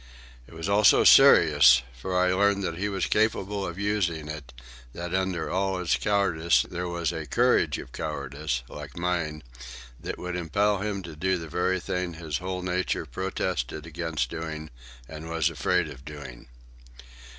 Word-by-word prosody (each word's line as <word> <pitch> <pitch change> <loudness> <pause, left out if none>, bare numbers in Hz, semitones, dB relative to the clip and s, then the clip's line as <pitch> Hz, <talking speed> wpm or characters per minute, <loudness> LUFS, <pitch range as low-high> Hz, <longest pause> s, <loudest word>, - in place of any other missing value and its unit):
It - - -15
was 80 +3 -4
also 100 +1 +5
serious, 70 -5 +7
for 90 +9 -3
I 90 0 +3
learned 100 +1 +2
that 85 -3 -2
he 105 +2 -1
was 95 -3 -1
capable 105 -2 0
of 85 0 -6
using 95 -7 -1
it, 75 -4 -7 0.4
that 85 0 -6
under 95 -3 -1
all 95 0 0
his 90 -2 +1
cowardice 90 -5 +2
there 90 +1 -4
was 85 -1 -2
a 80 -3 -5
courage - - +2
of 60 - -9
cowardice, 70 -3 -4
like 75 -1 -10
mine, 85 -3 -2 0.6
that - - -5
would 90 0 -5
impel 100 +4 +1
him 100 -1 -3
to 85 -2 -9
do 95 +4 0
the 80 -1 -7
very 90 +3 0
thing 90 -1 -3
his 80 -3 -4
whole 90 0 -4
nature 90 0 -1
protested 85 -2 -3
against 80 -6 -3
doing 80 -1 -6 0.4
and 80 +1 -8
was 85 0 +1
afraid 85 +4 +1
of 70 -3 -11
doing. 70 -5 -10
85 Hz, 160 wpm, -26 LUFS, 75-95 Hz, 0.6 s, serious